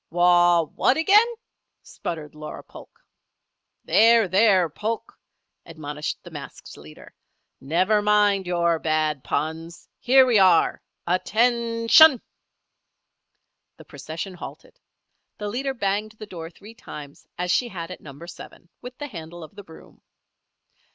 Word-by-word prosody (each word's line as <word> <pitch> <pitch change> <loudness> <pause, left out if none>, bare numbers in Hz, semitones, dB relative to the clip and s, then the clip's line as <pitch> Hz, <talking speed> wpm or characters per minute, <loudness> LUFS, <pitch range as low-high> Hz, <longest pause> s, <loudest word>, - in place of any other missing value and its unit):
"Wau 175 0 +4
what 260 - +2
again?" 405 +8 +5 0.6
sputtered 155 -3 -7
Laura 150 0 -9
Polk. - - -16 0.8
"There, 230 -1 +4
there, 190 -1 +3
Polk!" 215 +8 -5 0.5
admonished 150 -2 -6
the - - -12
masked - - -10
leader. 75 +1 -15 0.5
"Never 185 +9 +1
mind 205 -2 +2
your 170 -2 +1
bad 155 -3 -1
puns. 165 +2 -4
Here 265 +1 +5
we 240 -5 +3
are. 185 -4 +3 0.2
Attention!" 230 - +4 1.6
The - - -15
procession 165 +5 -8
halted. 180 - -12 0.6
The 210 0 -5
leader 265 +5 -3
banged 210 0 -2
the 220 0 -10
door 165 -5 -9
three 205 +6 -15
times 145 -9 -12
as 180 0 -2
she 245 - +1
had 175 -5 -7
at 185 - -10
Number 145 +3 -12
Seven, 175 0 -13
with 250 +1 -10
the 290 - -6
handle 170 - -9
of 155 - -13
the 205 - -11
broom. 160 -3 -17
185 Hz, 125 wpm, -23 LUFS, 165-225 Hz, 1.6 s, again